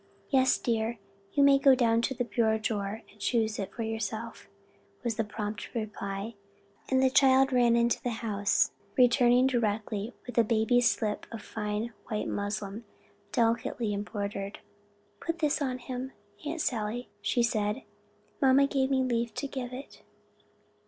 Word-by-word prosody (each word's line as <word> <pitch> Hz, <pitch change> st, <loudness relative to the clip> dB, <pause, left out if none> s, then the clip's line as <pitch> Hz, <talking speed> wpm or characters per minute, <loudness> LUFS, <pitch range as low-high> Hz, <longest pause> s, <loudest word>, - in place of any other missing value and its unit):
"Yes, 260 Hz, -2 st, +4 dB
dear, 230 Hz, 0 st, -1 dB, 0.4 s
you 285 Hz, -, +4 dB
may 280 Hz, -1 st, +6 dB
go 275 Hz, -1 st, +6 dB
to 230 Hz, 0 st, +2 dB
the 245 Hz, -, 0 dB
bureau 225 Hz, -2 st, +1 dB
drawer 215 Hz, -1 st, -3 dB
and 210 Hz, -, -22 dB
choose 220 Hz, 0 st, +1 dB
it 195 Hz, -1 st, -3 dB
yourself," 225 Hz, 0 st, -4 dB, 0.6 s
was 235 Hz, -2 st, 0 dB
the 225 Hz, -, 0 dB
prompt 210 Hz, +2 st, -5 dB
reply, 210 Hz, -1 st, -4 dB, 0.6 s
and 260 Hz, 0 st, +3 dB
the 260 Hz, -, +5 dB
child 265 Hz, 0 st, +5 dB
ran 240 Hz, -2 st, +4 dB
into 235 Hz, 0 st, +2 dB
the 245 Hz, -, -1 dB, 0.2 s
house, 205 Hz, -2 st, +2 dB, 0.3 s
returning 245 Hz, 0 st, +5 dB
directly 220 Hz, -3 st, -1 dB
with 245 Hz, -1 st, -1 dB
a -, -, +7 dB
baby's 230 Hz, +2 st, +3 dB
slip 210 Hz, -2 st, -2 dB
of 225 Hz, -2 st, -7 dB
fine 215 Hz, +2 st, -3 dB
white 215 Hz, -2 st, -2 dB
muslin, 205 Hz, +1 st, -3 dB, 0.5 s
delicately 230 Hz, -1 st, +1 dB
embroidered. 200 Hz, -1 st, -4 dB, 0.6 s
"Put 330 Hz, 0 st, -3 dB
this 300 Hz, -1 st, +1 dB
on 260 Hz, -3 st, -1 dB
him, 255 Hz, +1 st, -6 dB, 0.3 s
Aunt 320 Hz, +1 st, -2 dB
Sally," 230 Hz, 0 st, -2 dB
she 240 Hz, +3 st, +1 dB
said; 215 Hz, +1 st, 0 dB, 0.6 s
"mamma 270 Hz, 0 st, +6 dB
gave 270 Hz, -1 st, +1 dB
me 265 Hz, -1 st, +2 dB
leave 235 Hz, -2 st, -1 dB
to -, -, -3 dB
get 260 Hz, -3 st, -5 dB
it." 260 Hz, +3 st, -9 dB
235 Hz, 145 wpm, -29 LUFS, 215-255 Hz, 0.6 s, a